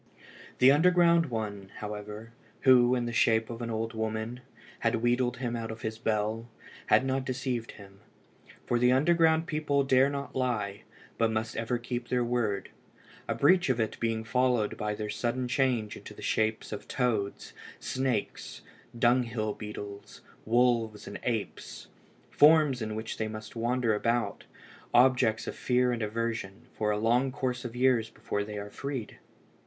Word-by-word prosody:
The 130 +2 +7
underground 170 +1 +4
one, 105 -5 -4
however, 105 +1 -7 0.3
who, 125 -1 +6
in 120 -1 -1
the 120 - -4
shape 115 0 +2
of 115 +1 -7
an 115 - -3
old 115 0 -3
woman, 110 +2 -3 0.4
had 115 +1 +1
wheedled 120 +2 +1
him 120 -2 -3
out 115 -1 -4
of 110 +2 -8
his 110 0 -4
bell, 110 +1 -1 0.4
had 130 - +4
not 135 0 0
deceived 125 -3 -3
him. 100 -1 -14 0.7
For 120 - +1
the 125 +1 +4
underground 160 +3 +3
people 150 -4 0
dare 135 0 +4
not 140 0 -5
lie, 110 -6 -2 0.3
but 115 -1 +3
must 110 0 -2
ever 115 +2 -1
keep 120 0 -5
their 125 -1 +1
word 120 -5 -1 0.6
a - - -1
breach 175 +2 +4
of 125 -2 +1
it 110 -1 -2
being 115 -1 -1
followed 125 -2 +1
by 105 0 -2
their 105 0 -4
sudden 125 +1 -2
change 120 -4 0
into - - -11
the - - -11
shape 110 0 0
of 105 - -6
toads, 110 -6 -1 0.3
snakes, 130 -4 -3 0.3
dunghill 120 -3 +1
beetles, 105 -1 -8 0.2
wolves, 115 -2 +2
and - - -7
apes, 115 -4 -4 0.4
forms 150 -4 +5
in 110 -1 -3
which 110 +1 -5
they 110 0 -1 0.2
wander 120 0 0
about, 115 +3 -1 0.5
objects 120 -3 +4
of - - -5
fear 125 0 +1
and 120 -1 -2
aversion, 110 -2 -3
for 105 - -1
a 105 - +1
long 120 +5 +2
course 125 -2 -3
of 120 -1 -6
years 125 -3 +2
before 105 - -3
they 105 0 -7
are 100 0 -6
freed. 135 -4 -5
120 Hz, 160 wpm, -29 LUFS, 110-130 Hz, 0.7 s, The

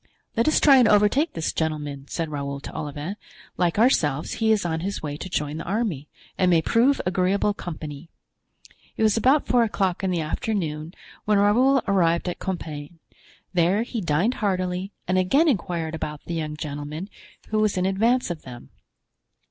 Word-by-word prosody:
"Let 230 +3 +2
us 310 - +4
try 275 -3 +7
and 250 -3 +6
overtake 210 +11 +3
this 165 -1 -2
gentleman," 150 -3 -3
said 165 -2 -3
Raoul 140 -1 -4
to - - -9
Olivain; 150 +6 -5 0.4
"like 175 0 0
ourselves 155 - +2
he 220 0 +4
is 210 -4 +2
on 160 -1 -1
his 195 +2 -4
way 145 -2 -3
to 180 +5 -7
join 150 -3 -2
the 165 - -5
army 190 - -2 0.3
and 185 - +4
may 170 -2 +5
prove 250 - +3
agreeable 185 +3 +1
company." 155 -4 -7 0.9
It - - +1
was 215 -1 +4
about 260 +6 +3
four 245 -1 +3
o'clock 195 -4 -1
in 190 - +1
the 180 -2 0
afternoon 160 -1 -3 0.3
when 210 -1 +3
Raoul 245 +6 +4
arrived 170 -3 +2
at 180 - -3
Compiegne; 160 -4 -5 0.6
there 180 +5 +2
he 235 -2 -4
dined 170 +8 +1
heartily 185 -1 -1 0.2
and 185 +1 +2
again 275 - +3
inquired 175 - -1
about 150 -2 -5
the 170 - -5
young 155 -2 -3
gentleman 150 +4 -5 0.4
who 215 - +1
was 215 -3 +1
in 185 - +1
advance 225 +4 +2
of 165 - -5
them. 125 -2 -11
180 Hz, 175 wpm, -24 LUFS, 155-210 Hz, 0.9 s, try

